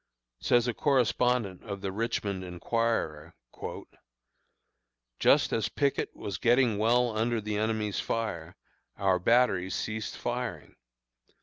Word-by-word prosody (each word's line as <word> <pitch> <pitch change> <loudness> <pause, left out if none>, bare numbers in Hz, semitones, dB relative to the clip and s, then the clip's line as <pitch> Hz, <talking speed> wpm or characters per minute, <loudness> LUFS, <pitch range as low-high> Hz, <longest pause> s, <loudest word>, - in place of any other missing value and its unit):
Says 120 0 +3
a 120 - 0
correspondent 125 - +1
of 100 -3 -6
the 95 -1 -3
Richmond 100 -2 -2
Enquirer: 90 -3 -2 1.8
"Just - - +4
as 110 - 0
Pickett 140 -2 -1
was 100 - -5
getting 120 -3 +3
well 120 +1 +3
under 115 +1 +1
the 105 -1 -3
enemy's 110 -2 -1
fire, 90 -7 -3 0.4
our 95 -2 +2
batteries 95 -4 +2
ceased 110 0 -4
firing. 120 0 -4
110 Hz, 110 wpm, -29 LUFS, 100-120 Hz, 1.8 s, Just